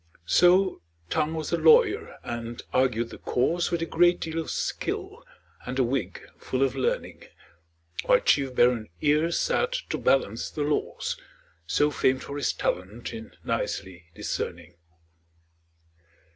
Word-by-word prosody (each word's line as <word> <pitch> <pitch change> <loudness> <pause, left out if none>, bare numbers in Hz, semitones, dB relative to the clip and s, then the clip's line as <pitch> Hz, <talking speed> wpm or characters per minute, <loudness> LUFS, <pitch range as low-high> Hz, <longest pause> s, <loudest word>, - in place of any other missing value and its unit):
So 180 - +4 0.3
Tongue 155 +2 0
was 155 -2 -4
the 170 - +1
lawyer, 160 0 +4
and 120 0 -5
argued 120 -3 +1
the - - -10
cause 170 +8 0
With 170 -1 -1
a - - 0
great 175 +2 +3
deal 160 0 -3
of 165 - -4
skill, - - -3 0.4
and 125 +1 -5
a 130 - +4
wig 125 0 -2 0.2
full 130 +1 -1
of 135 -1 +1
learning; 130 - -2 0.8
While - - +5
chief 135 -2 +2
baron 120 -5 +3
Ear 150 +2 +3
sat 475 - +1 0.2
to - - -1
balance 115 -4 +1
the 150 - -3
laws, 150 +1 -2 0.5
So 150 - +2
famed 130 -2 +1
for 140 - -6
his 145 - +1
talent 100 +6 -3
in 110 -1 -9
nicely 85 -3 -3
discerning. 85 +1 -4
135 Hz, 140 wpm, -26 LUFS, 120-160 Hz, 0.8 s, While